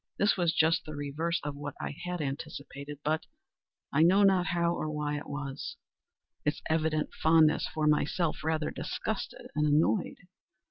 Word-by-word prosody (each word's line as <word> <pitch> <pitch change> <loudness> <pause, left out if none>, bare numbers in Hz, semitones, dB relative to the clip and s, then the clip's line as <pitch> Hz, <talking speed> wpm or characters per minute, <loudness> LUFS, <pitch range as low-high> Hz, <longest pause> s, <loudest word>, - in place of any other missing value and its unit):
This 205 0 +3
was 175 -3 +2
just 160 +1 +3
the 155 - -7
reverse 150 +4 -1
of 145 -1 -3
what 145 0 -6
I - - -3
had 180 -1 -2
anticipated; 140 0 -5
but—I 155 -1 -4
know 190 +5 +6
not 190 -3 +4
how 170 +1 +1
or 155 - -2
why 150 -1 -2
it - - -10
was—its 145 +1 -6
evident 155 -1 0
fondness 160 -1 +4
for 155 -1 -1
myself 150 +2 +1
rather 160 -1 0
disgusted - - -4
and 150 0 +2
annoyed. 155 +6 +2
155 Hz, 145 wpm, -30 LUFS, 145-165 Hz, -, know